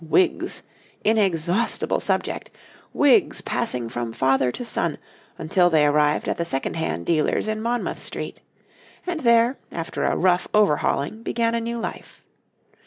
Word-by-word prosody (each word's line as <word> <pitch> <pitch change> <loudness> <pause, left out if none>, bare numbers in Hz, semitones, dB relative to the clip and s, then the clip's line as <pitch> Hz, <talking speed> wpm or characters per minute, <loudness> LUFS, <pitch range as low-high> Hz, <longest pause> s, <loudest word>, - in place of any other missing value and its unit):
Wigs! 345 - +1 0.4
inexhaustible 195 -1 +1
subject - - -1 0.4
wigs 290 +7 +3
passing 125 - -2
from 120 0 -4
father 130 0 +2
to 245 - -6
son - - -1 0.4
until 175 +3 +2
they 155 -3 +4
arrived 150 0 +2
at - - -2
the - - +1
second 135 -3 -2
hand 160 - -2
dealers 155 +5 +1
in 215 0 -2
Monmouth 235 +1 -2
Street, - - -6 0.7
and 355 -3 -2
there, 235 -1 +3
after 165 -1 -4
a - - +1
rough 180 -1 +2
overhauling, 205 -1 +1
began 230 0 0
a 235 - 0
new 235 +1 -3
life. 230 - -7
185 Hz, 140 wpm, -23 LUFS, 150-235 Hz, 0.7 s, they